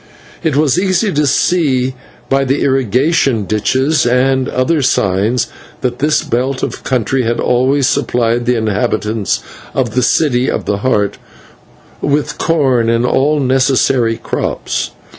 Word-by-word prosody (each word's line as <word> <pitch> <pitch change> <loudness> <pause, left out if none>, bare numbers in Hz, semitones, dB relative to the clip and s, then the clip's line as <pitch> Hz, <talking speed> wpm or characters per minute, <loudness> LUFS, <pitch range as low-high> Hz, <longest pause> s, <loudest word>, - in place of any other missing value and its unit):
It 160 -5 0
was 150 +1 +2
easy 190 +2 +1
to 150 0 +1
see 135 -4 +1 0.3
by 135 0 +1
the 135 +1 0
irrigation 135 -2 +1
ditches 130 - +1
and 130 +2 +1
other 145 +5 0
signs 105 0 +1 0.4
that 125 -1 -2
this 150 +2 +1
belt 130 +2 -2
of - - -4
country 130 +1 0
had 120 0 -1
always 130 +3 +2
supplied 120 0 0
the 125 -1 +2
inhabitants 110 -1 -1 0.3
of 125 -5 -1
the 125 - +1
City 125 -1 +2
of - - -3
the 100 - -1
Heart 105 -3 0 0.8
with 145 +1 -1
corn 130 -8 +1
and 115 +1 +1
all 145 +4 +2
necessary 130 -3 +2
crops. - - -3
130 Hz, 135 wpm, -14 LUFS, 120-140 Hz, 0.8 s, was